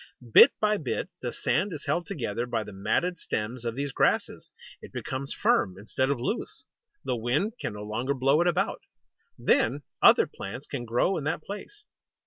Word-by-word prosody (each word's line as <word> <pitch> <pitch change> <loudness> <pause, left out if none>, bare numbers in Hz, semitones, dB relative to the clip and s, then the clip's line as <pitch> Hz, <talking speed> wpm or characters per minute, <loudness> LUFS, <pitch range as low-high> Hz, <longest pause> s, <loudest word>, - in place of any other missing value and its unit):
Bit - - +10
by 210 0 +2
bit, 145 -9 -3
the - - -3
sand 200 +2 0
is 150 - -7
held 165 +4 -1
together 120 - -3
by 115 -2 -1
the 105 -1 -10
matted 175 - 0
stems 115 +3 -3
of 115 -1 -3
these 140 +1 -2
grasses. - - 0 0.3
It - - -11
becomes 135 +1 -4
firm, 90 0 +2
instead 120 +6 -1
of 140 -3 0
loose; 130 - -3 0.4
the - - -1
wind 125 - 0
can - - -3
no 105 0 -7
longer 120 +6 -2
blow 135 +4 +3
it 175 - +2
about. 175 - 0 0.6
Then 135 +6 +2 0.2
other - - +7
plants 125 +9 -8
can 125 -4 -5
grow 120 +11 +1
in 155 - -4
that 155 0 -2
place. 410 - -9
135 Hz, 180 wpm, -27 LUFS, 115-160 Hz, 0.6 s, Bit